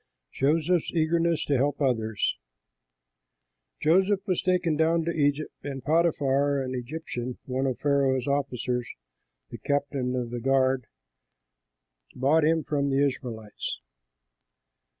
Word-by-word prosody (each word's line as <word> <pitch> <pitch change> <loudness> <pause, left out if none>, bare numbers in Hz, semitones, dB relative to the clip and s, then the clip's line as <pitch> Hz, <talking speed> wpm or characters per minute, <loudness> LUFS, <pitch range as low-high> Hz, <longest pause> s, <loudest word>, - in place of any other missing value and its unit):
JOSEPH'S 160 +4 +1
EAGERNESS 165 0 +1
TO 140 - +2
HELP 140 +2 0
OTHERS 110 -6 0 1.4
Joseph 190 +4 +3
was 185 -4 0
taken 180 -3 +1
down 160 +1 +2
to 170 - 0
Egypt, 145 -1 0
and 135 -3 -6
Potiphar, 145 -3 +2
an 130 -1 -3
Egyptian, 125 -1 -5
one 130 +1 -1
of 130 - -1
Pharaoh's 135 -3 +1
officers, 125 -3 -1 0.6
the - - -7
captain 140 -3 -1
of 120 -2 -3
the 120 - -3
guard, 130 -1 +2 1.3
bought 145 +5 +3
him 160 +1 +2
from 140 -1 0
the 140 +1 +3
Ishmaelites. 115 - -4
140 Hz, 115 wpm, -27 LUFS, 130-160 Hz, 1.4 s, Joseph